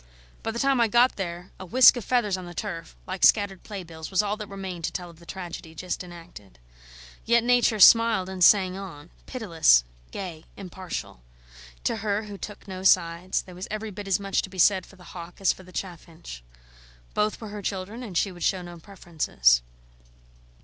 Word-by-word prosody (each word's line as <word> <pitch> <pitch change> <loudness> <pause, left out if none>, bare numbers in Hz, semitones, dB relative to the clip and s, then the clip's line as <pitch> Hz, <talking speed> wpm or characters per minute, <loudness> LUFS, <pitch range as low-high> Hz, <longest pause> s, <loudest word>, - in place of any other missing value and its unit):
By - - -3
the 225 - -4
time 270 0 +2
I 230 - +4
got 240 +4 +4
there 175 -1 -6
a - - -7
whisk 255 +8 +7
of 245 - -5
feathers 225 -6 +1
on 185 -1 -7
the 175 - -10
turf 165 -5 -6
like 185 0 -5
scattered 200 -3 +4
playbills 170 -6 -8
was 190 +1 +2
all 205 0 -1
that 210 -2 -7
remained 190 -3 -6
to - - -2
tell 175 -2 -6
of 165 - -20
the 170 - -17
tragedy 170 -3 -8
just 180 +3 -4
enacted. 170 - -13 0.7
Yet 235 0 +3
Nature 245 -3 +3
smiled 230 -2 +6
and 190 -1 -2
sang 185 -1 +5
on, 175 -5 -9 0.2
pitiless, 165 - +3 0.3
gay, 170 -5 -7
impartial. 185 - -7 0.6
To - - 0
her, 210 0 -1
who 205 -2 -9
took 210 - -9
no 185 -1 -6
sides, 180 -1 +2
there 185 - -13
was 180 +2 -7
every 215 0 -4
bit 205 +1 -8
as 195 -1 +2
much 195 -1 0
to - - -8
be 190 - -12
said 185 +1 +4
for - - -17
the 185 - -17
hawk 175 -1 -9
as 195 - +3
for - - -15
the 185 0 -15
chaffinch. 170 - -8 0.7
Both 210 0 0
were 220 - -8
her 205 0 -7
children, 200 +4 -4
and 205 -8 -5
she 195 - +1
would 175 -1 -13
show 185 +2 0
no 175 -1 -10
preferences. 160 - +1
190 Hz, 200 wpm, -26 LUFS, 175-210 Hz, 0.7 s, whisk